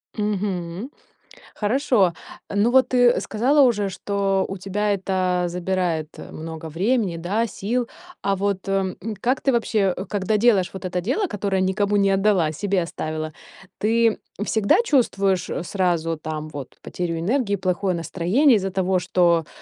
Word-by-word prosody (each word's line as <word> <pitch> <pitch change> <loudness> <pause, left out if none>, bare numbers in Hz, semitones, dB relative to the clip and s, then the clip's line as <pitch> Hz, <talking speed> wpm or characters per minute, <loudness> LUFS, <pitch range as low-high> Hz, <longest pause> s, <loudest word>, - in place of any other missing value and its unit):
Мгм. 200 0 -3 0.6
Хорошо, 215 -4 +2 0.4
ну 205 +4 +3
вот 260 +1 +4
ты 245 -1 +4
сказала 265 +7 +2
уже, 210 -6 +3
что 195 0 -1
у 195 - -5
тебя 205 +2 -1
это 185 -2 0
забирает 175 -3 -1 0.2
много 160 0 -7
времени, 195 +2 0
да, 195 +8 -1
сил, 230 +4 -2 0.3
а 195 0 +1
вот, 195 0 -2
м, 195 -1 0 0.3
как 255 +2 +1
ты 275 - +2
вообще, 215 -5 +1 0.2
когда 205 +1 0
делаешь 210 -4 +3
вот 190 - -8
это 180 0 -1
дело, 260 - 0
которое 200 - -1
никому 200 +2 +1
не 200 -1 +3
отдала, 195 -5 +2
себе 195 +3 0
оставила, 155 -1 -4 0.5
ты 225 +1 +2 0.3
всегда 220 -2 +3
чувствуешь 195 - +1 0.2
сразу 170 -4 0
там 155 0 -5
вот 140 -4 -8
потерю 170 -2 -3
энергии, 205 +3 0
плохое 185 0 -1
настроение 190 - +2
из-за 195 0 -3
того, 190 0 +1
что, 170 -3 +2
195 Hz, 140 wpm, -23 LUFS, 180-215 Hz, 0.6 s, вот